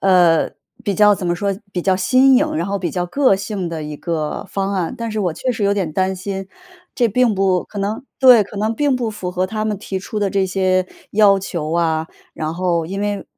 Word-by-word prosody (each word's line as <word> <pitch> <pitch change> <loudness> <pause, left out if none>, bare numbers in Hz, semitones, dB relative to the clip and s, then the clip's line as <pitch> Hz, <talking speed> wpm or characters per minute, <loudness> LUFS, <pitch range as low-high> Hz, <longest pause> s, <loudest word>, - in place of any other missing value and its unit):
呃， 175 -4 +4 0.3
比 205 -4 -1
较 210 +1 +5
怎 185 -1 -6
么 175 0 0
说， 200 0 -1 0.2
比 180 - -2
较 190 +1 +2
新 260 +8 +4
颖， 300 - +1
然 170 +3 -1
后 200 - -1
比 175 -4 -3
较 180 -1 -2
个 255 0 +3
性 195 -3 -4
的 165 -2 -5
一 150 0 -6
个 160 -3 -3
方 195 0 -2
案， 180 -4 -1
但 230 0 -3
是 215 - -2
我 180 -4 0
确 250 +10 -2
实 225 - -4
有 200 0 +3
点 185 -6 -2
担 190 +2 0
心， 195 0 -5 0.5
这 240 - +3
并 240 +2 +2
不 190 -2 +1
可 205 - -9
能 210 +6 -3
对， 250 -5 +7
可 200 - -11
能 215 +2 0
并 285 0 +1
不 240 -3 -2
符 190 -4 -5
合 185 +1 -1
他 215 +2 -3
们 210 -3 -2
提 190 -2 -4
出 210 +3 -5
的 200 -1 +1
这 195 0 +1
些 185 -1 +1 0.3
要 205 -2 +5
求 170 -5 -4
啊。 160 -1 0 0.3
然 155 0 -3
后 170 -2 0
因 195 +4 -5
为 205 -1 -2
195 Hz, 250 characters per minute, -19 LUFS, 180-210 Hz, 0.5 s, 对